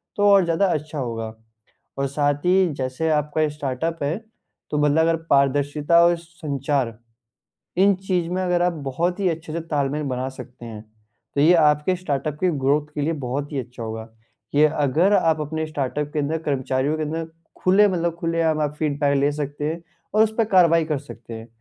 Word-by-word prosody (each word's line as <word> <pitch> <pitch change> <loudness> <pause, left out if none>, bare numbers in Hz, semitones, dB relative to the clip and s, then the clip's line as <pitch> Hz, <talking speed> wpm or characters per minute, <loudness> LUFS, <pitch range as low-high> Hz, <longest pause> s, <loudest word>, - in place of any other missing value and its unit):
तो 205 - +2
और 200 -1 +6
ज़्यादा 170 +4 +2
अच्छा 155 0 -4
होगा। 115 -3 -4 0.6
और 140 - 0
साथ 145 +1 +1
ही 185 +1 +4
जैसे 130 +4 -2
आपका 150 +1 0
ये 155 - +2
स्टार्टअप 150 +3 -3
है, 150 +5 0 0.5
तो 150 - -1
मतलब 150 +1 +2
अगर 165 - +3
पारदर्शिता 145 +4 +3
और 175 0 +4
संचार, 140 -7 -3 0.8
इन 200 +2 +5
चीज़ 180 -3 0
में 185 +1 -1
अगर 180 -1 +1
आप 175 0 +2 0.2
बहुत 175 +8 -1
ही 190 -2 +2
अच्छे 160 -1 -5
से 170 - -2
तालमेल 150 -2 -1
बना 125 +1 -2
सकते 125 -2 -11
हैं, 110 -2 -8 0.5
तो 140 - +2
ये 160 +4 +6
आपके 150 +2 +3
स्टार्टअप 150 -4 -3
के 185 - +2
ग्रोथ 145 +3 +1
के 150 - -1
लिए 160 +3 0
बहुत 140 +4 -3
ही 140 - -2
अच्छा 125 -1 -7
होगा। 110 0 -6 0.5
ये 150 +1 +6 0.2
अगर 160 +9 +3
आप 160 -5 +3
अपने 160 +1 -3
स्टार्टअप 145 0 -3
के 155 - 0
अंदर 150 +3 -1
कर्मचारियों 135 +2 0
के 155 - -2
अंदर 160 +2 -3 0.4
खुले 200 +3 +5
मतलब 170 -3 -1
खुलेआम 165 -2 0
आप 150 0 -1
फीडबैक 145 -2 +1
ले 140 +1 +2
सकते 145 0 -4
हैं 160 +3 -3 0.3
और 215 +1 +5
उस 220 - 0
पे 225 - +3
कार्रवाई 170 -5 +4
कर 155 -2 -1
सकते 120 -5 -11
हैं 115 +1 -8
150 Hz, 190 wpm, -23 LUFS, 140-165 Hz, 0.8 s, और